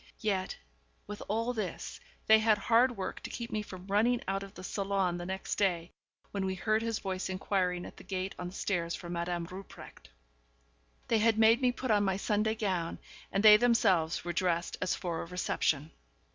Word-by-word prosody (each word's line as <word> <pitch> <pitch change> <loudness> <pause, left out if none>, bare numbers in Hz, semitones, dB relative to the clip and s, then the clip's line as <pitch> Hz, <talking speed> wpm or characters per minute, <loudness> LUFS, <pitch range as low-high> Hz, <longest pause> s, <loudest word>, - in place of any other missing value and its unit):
Yet, 195 -4 -1 0.5
with 210 0 -7
all 230 +4 0
this, 210 -7 -4 0.3
they 220 0 +7
had 220 -1 +4
hard 235 +4 +3
work 190 - -4
to - - -7
keep 235 -1 -6
me 215 - -1
from 185 -3 -9
running 220 +5 +2
out 195 +1 -1
of 195 0 -10
the 185 - -9
salon 195 -2 -1
the 175 - -5
next 190 0 -3
day, 175 -4 +1 0.4
when 200 -1 -2
we 190 0 -1
heard 215 +4 +1
his 225 -1 -1
voice 190 -1 -3
inquiring 185 -1 -1
at - - -11
the - - -12
gate 190 0 -3
on 180 - -4
the 180 - -9
stairs 170 -5 -1
for 175 - -8
Madame 170 0 -2
Rupprecht. 185 +3 -11 1.0
They 225 - +3
had 225 0 +3
made 225 +3 +5
me 250 -1 +4
put 245 0 -3
on 205 -1 +4
my 190 -1 +1
Sunday 210 +2 +1
gown, 185 -7 -1 0.3
and 195 - 0
they 210 -1 +10
themselves 200 -10 +2
were 175 - -2
dressed 175 -1 0
as 185 - +1
for 170 -2 -3
a - - -5
reception. 160 -4 0
195 Hz, 195 wpm, -31 LUFS, 180-220 Hz, 1.0 s, they